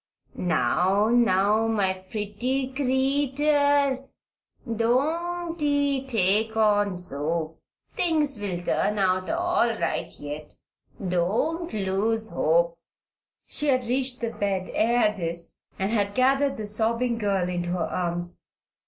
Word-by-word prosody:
Now, 190 +3 +1
now, 220 -2 +3
my 205 -4 +1
pretty 210 +7 -3
creetur 280 +1 +2 0.7
don't 330 +8 0
ee 285 -2 +1
take 220 -1 +1
on 205 -3 +2
so. 160 0 -3 0.4
Things 300 -7 +2
will 200 -4 -3
turn 210 +3 0
out 185 -1 +1
all 350 -6 +2
right 165 - -2
yet. 145 +1 -7 0.5
Don't 220 - 0
lose 215 +2 0
hope." 170 +1 +1 0.7
She 295 - -1
had 255 -3 +2
reached 255 +1 -1
the 230 -1 -2
bed 195 -3 -2
ere 235 -1 +3
this 170 -2 -5
and 195 +2 -1
had 205 -3 0
gathered 270 +2 +2
the 215 - -4
sobbing 230 +3 0
girl 195 -4 0
into 175 -1 -3
her 175 -2 -1
arms. 175 -1 -3
220 Hz, 115 wpm, -25 LUFS, 185-265 Hz, 0.7 s, now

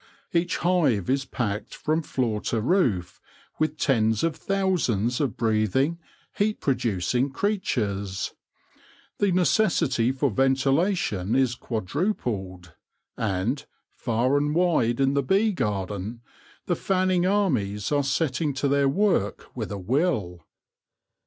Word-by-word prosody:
Each 170 0 +1
hive 145 - +2
is 135 0 0
packed 105 -4 -3
from 155 +2 0
floor 120 -8 -1
to 115 - 0
roof 110 - 0 0.4
with 155 0 0
tens 110 -7 +2
of 165 -2 +1
thousands 160 - 0
of 135 -6 -1
breathing, 115 - +1 0.3
heat 210 +1 0
producing 120 0 0
creatures: 105 - -2 0.9
the 200 -2 +2
necessity 165 - +2
for 135 0 0
ventila 135 - +2
tion 100 - -1
is 130 -2 +3
quadrupled, 110 - -3 0.4
and, 110 +7 -1 0.3
far 125 +3 +1
and 145 +1 0
wide 160 -10 +2
in 135 0 +3
the 140 - +2
bee 195 +10 +2
garden, 105 - -3 0.4
the - - 0
fanning 185 -1 +1
armies 125 - 0
are 145 -1 +2
setting 140 0 0
to 140 +1 0
their 140 0 +3
work 170 - 0
with 110 -6 -4
a 100 - -3
will. 105 - -1
130 Hz, 120 wpm, -25 LUFS, 110-165 Hz, 0.9 s, is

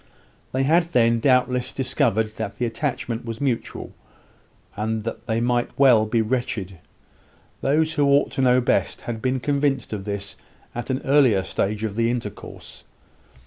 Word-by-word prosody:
They 130 +1 0
had, 170 +4 +2
then, 115 -1 +4
doubtless 125 -1 +2
discovered 115 -5 0
that 110 -3 -4
the 125 - -1
attachment 120 -1 -3
was 115 -1 -6
mutual; 130 -5 -3 0.8
and 110 +1 -2 0.2
they 115 -1 0
might 120 0 0
well 120 -6 +5
be 115 +1 +1
wretched. 110 -6 -3 0.8
Those 155 +3 +2
who 145 -3 +2
ought 140 +1 +3
to - - -2
know 125 0 +4
best 120 - 0
had 115 -2 -5
been 130 +1 0
convinced 140 -2 0
of 100 -2 -4
this 100 -1 -5 0.4
at 120 +2 -5
an 130 0 -2
earlier 130 -9 +4
stage 105 +2 -2
of 110 -2 -2
the 115 +2 +1
intercourse. 120 -1 -6
120 Hz, 150 wpm, -23 LUFS, 110-135 Hz, 0.8 s, well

